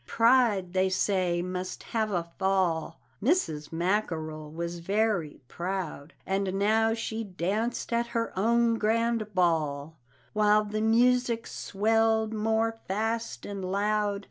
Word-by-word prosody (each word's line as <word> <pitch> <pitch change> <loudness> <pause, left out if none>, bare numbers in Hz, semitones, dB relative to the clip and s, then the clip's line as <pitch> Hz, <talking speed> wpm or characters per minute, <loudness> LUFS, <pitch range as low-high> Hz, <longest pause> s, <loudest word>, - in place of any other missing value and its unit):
"Pride," 230 -6 +3
they 190 0 +2
say, 185 -2 +1
"must 185 0 -5
have 220 -2 +1
a 175 -3 0 0.2
fall 190 -4 0
" - - -18
Mrs. 165 - 0
Mackerel 165 -4 -2
was 170 +2 -5
very 195 -3 0
proud 175 -3 -5
And 195 0 -1
now 220 +3 +2
she 225 0 -3
danced 210 +6 -2
at 235 0 +1
her 230 -1 -2
own 230 +3 +2
grand 225 -1 0
ball, 160 -3 0 0.3
While 210 0 +4
the 215 +1 -3
music 235 +1 +3
swelled 220 +1 +1
more 225 +1 0
fast 225 +4 -2
and 200 -2 -5
loud. 205 +2 0
205 Hz, 125 wpm, -28 LUFS, 180-225 Hz, 0.3 s, While